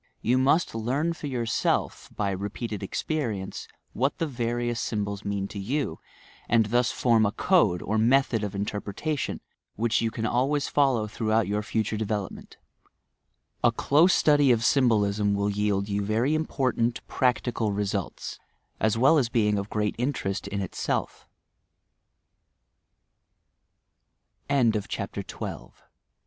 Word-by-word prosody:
You 125 +3 +3
must 140 +6 +2
learn 130 +9 -1
for 155 - -7
yourself, 120 -4 -1
by 100 -2 0
repeated 105 +3 -4
experience, 105 -2 -3 0.3
what 135 +4 0
the 165 - 0
various 120 -3 -2
symbols 100 -2 -3
mean 100 -1 -2
to 100 - -6
you, 135 +9 -2 0.5
and 115 -1 +4
thus 120 +3 +2
form 115 -3 +3
a 100 - +2
"code" 105 - +2
or 110 +1 0
method 120 -1 +3
of 100 -1 -4
interpretation 105 +8 -3 0.3
which 115 0 +1
you 115 - +1
can 115 0 -4
always 140 +5 +1
follow 135 -6 +2
throughout 110 0 0
your 105 +1 0
future 110 0 -1
development, 105 -2 -4 1.1
A - - +5
close 160 +6 +4
study 145 -3 +4
of 115 0 +2
symbolism 105 -6 +3
will 100 0 0
yield 100 -1 0
you 100 0 -1
very 110 +8 +1
important, 130 -6 0
practical 120 -4 0
results, 100 -2 -3 0.4
as 110 0 +2
well 135 +6 +5
as 120 -4 0
being 105 -4 +2
of 100 +1 -5
great 105 -1 0
interest 105 -7 -2
115 Hz, 120 wpm, -26 LUFS, 105-130 Hz, 1.1 s, A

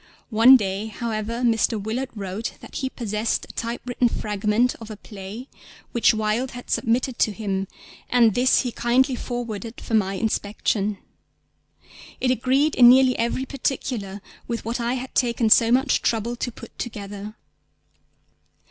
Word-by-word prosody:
One 235 +4 +8
day, 200 -1 -3
however, 225 +1 -4
Mr. 225 -2 +2
Willard 230 +6 -3
wrote 200 +2 -4
that - - -9
he 265 - -2
possessed 220 -3 -2
a - - -13
typewritten 240 +1 -1
fragment 210 +3 0
of 225 - -9
a 215 - -7
play 210 +5 -9 0.4
which 235 - +4
Wilde 220 +3 -1
had 245 - -9
submitted 240 +2 0
to 215 - +3
him, 195 -2 -3 0.4
and 235 -3 +4
this 250 +3 +3
he 250 - -3
kindly 255 +3 +2
forwarded 235 -2 -5
for - - -7
my 195 -3 +2
inspection. 210 -1 -1 1.2
It 255 - +2
agreed 265 +5 +2
in 245 -1 +8
nearly 255 0 +6
every 235 +3 -1
particular 240 -7 -3 0.3
with 235 -2 -4
what 235 +2 -2
I 240 +1 -1
had 260 0 -6
taken 235 -2 +1
so 230 +1 +6
much 265 +2 +3
trouble 230 +1 0
to 245 +1 -3
put - - -13
together. 205 -2 -6
230 Hz, 150 wpm, -23 LUFS, 210-245 Hz, 1.2 s, One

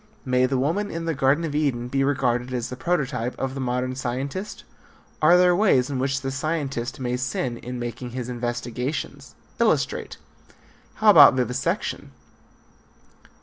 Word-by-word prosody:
May 130 0 +2
the 130 0 0
woman 170 +11 0
in 165 -2 -5
the 165 - 0
Garden 140 +3 +2
of 155 - -4
Eden 135 -5 0
be 135 +2 0
regarded 130 -3 0
as 120 -2 -3
the 125 - -5
prototype 130 -4 -2
of 135 0 -3
the 135 - -6
modern 125 0 -2
scientist? 135 +10 -4 0.6
Are 170 +3 +6
there 180 0 +5
ways 145 -10 +3
in 135 - -2
which 135 +1 -1
the 135 0 -3
scientist 135 -4 -3
may 125 -1 -1
sin 125 -1 -2
in 125 +1 -6
making 120 +1 -5
his 125 0 -5
investigations? 120 +3 -4 0.2
Illustrate. - - 0 0.8
How 215 -1 +6
about 145 -7 +9
vivisection? 125 - -2
130 Hz, 150 wpm, -24 LUFS, 125-145 Hz, 0.8 s, about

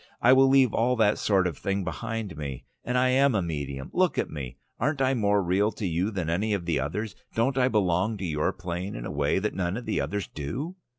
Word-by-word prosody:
"I 125 - +6
will 135 0 +6
leave 135 -4 +5
all 125 +2 +2
that 110 -3 +3
sort 95 -3 +2
of 85 -5 -3
thing 100 0 -1
behind 105 +1 -4
me. 70 -4 -6 0.2
And 125 +1 -1
I 130 0 +3
am 135 -1 +4
a 100 - +2
medium. 70 -5 -4
Look 185 -1 +2
at - - -1
me! 65 -4 -6 0.2
Aren't 145 +3 0
I 135 0 +3
more 105 -4 +2
real 95 +5 +2
to 105 - -5
you 90 +3 0
than 95 -7 -3
any 100 +6 0
of 90 -4 -5
the 85 -3 +1
others? 95 +10 -3 0.2
Don't 125 +4 +1
I 130 -1 +3
belong 105 -2 +1
to 95 - -4
your 75 -3 0
plane 90 +1 -5
in - - -6
a - - -4
way 70 0 +1
that 105 +2 -1
none 95 +1 -1
of 125 - -6
the 110 - 0
others 100 -2 -3
do? 130 - -5
100 Hz, 240 wpm, -27 LUFS, 85-120 Hz, 0.2 s, I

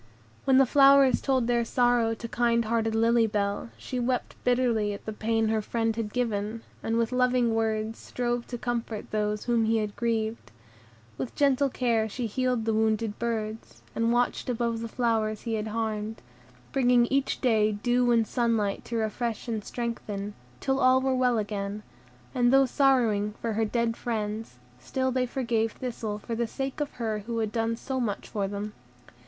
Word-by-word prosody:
When 265 -1 +5
the 270 - +7
flowers 275 -1 +6
told 260 -3 +1
their 240 0 +2
sorrow 240 -1 +2
to 230 - -7
kind 235 0 +1
hearted 225 0 0
Lily 230 0 +4
Bell, 205 +1 -1
she 255 - -4
wept 245 +1 -1
bitterly 240 -4 +2
at 200 - -9
the 220 - -4
pain 225 +1 0
her 220 -1 +1
friend 225 +1 -1
had 220 -2 -3
given, 225 -2 -2 0.2
and 225 +1 -1
with 230 0 +1
loving 250 -2 +2
words 220 0 -1
strove 240 -1 -2
to 245 - -5
comfort 230 -3 -4
those 210 0 -1
whom 235 -2 +2
he 225 +1 +2
had 210 -2 -2
grieved; 225 - -2 0.7
with 255 - -4
gentle 280 -1 +3
care 230 -4 +1
she 245 +4 -3
healed 250 +1 0
the 225 - +1
wounded 220 0 0
birds, 220 -2 -4
and 230 0 +1
watched 245 +1 0
above 235 -1 -1
the 230 - -3
flowers 220 -2 0
he 230 - -3
had 220 0 -2
harmed, 220 0 -3 0.5
bringing 245 -2 +4
each 275 0 +1
day 220 -4 +3
dew 245 +4 +1
and 230 -1 +4
sunlight 225 -4 0
to 235 - -5
refresh 225 +1 -2
and 220 -3 -2
strengthen, 210 -4 -4 0.3
till 270 - 0
all 255 0 +5
were 265 0 +1
well 250 -2 +2
again; 205 0 -3 0.5
and 245 -1 +3
though 270 0 +6
sorrowing 230 -6 +2
for 230 -1 -2
their 220 +1 +1
dead 230 +1 0
friends, 215 - -4 0.2
still 260 - -1
they 255 0 0
forgave 230 -3 0
Thistle 225 -4 -4
for 220 +2 -6
the 235 0 -1
sake 270 +4 -4
of 290 - -3
her 220 -3 -2
who 235 -1 -2
had 220 -2 -1
done 230 0 0
so 260 +3 -4
much 215 -5 -2
for 200 -2 -2
them. 205 +1 -5
230 Hz, 180 wpm, -27 LUFS, 215-245 Hz, 0.7 s, the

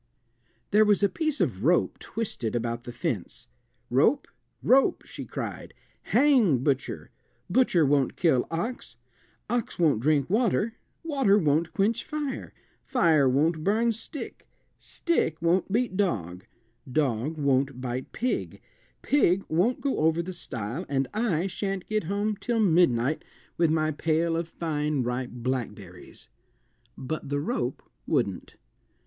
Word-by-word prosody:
There 215 +1 +6
was 210 -1 +3
a 200 - +5
piece 310 - -2
of 110 - 0
rope 170 +5 +2
twisted 160 - -3
about 120 0 -2
the 120 - -6
fence. 120 - -3 0.5
"Rope, 140 - +3 0.4
rope," 265 +1 +4
she - - -8
cried, - - -6 0.3
"hang 235 - +3
butcher; 140 -2 -1 0.4
butcher 190 -11 +4
won't 140 -2 +2
kill 145 -9 +2
ox, 220 +10 -4 0.5
ox 240 -2 -2
won't 155 -9 +3
drink 145 0 +2
water, 220 +1 +1 0.3
water 270 -11 +3
won't 160 -1 +1
quench 215 +7 +1
fire, 300 -3 -4 0.3
fire 160 - +3
won't 155 +4 +1
burn 225 +5 +2
stick, 230 +6 -8 0.3
stick 325 - -1
won't 175 +3 +1
beat 230 -2 0
dog, 95 - -1 0.4
dog 140 +1 0
won't 135 -2 +1
bite 125 0 -4
pig, 250 +2 -2 0.4
pig 195 -10 +3
won't 185 +11 +1
go 280 - -1
over 160 +2 +2
the 185 +2 -6
stile, 125 - -5
and 135 -1 0
I 205 -6 0
shan't 195 0 -3
get 215 -5 -1
home 205 +3 -1
till 235 +2 -1
midnight 160 - +3 0.3
with 170 -2 +2
my 155 0 +1
pail 165 +2 0
of 165 0 -2
fine 150 -4 -1
ripe 125 +1 -2
blackberries." 115 -7 -6 0.7
But 140 +2 -5
the 145 0 0
rope 240 - -2 0.2
wouldn't. - - -1
165 Hz, 130 wpm, -27 LUFS, 135-210 Hz, 0.7 s, There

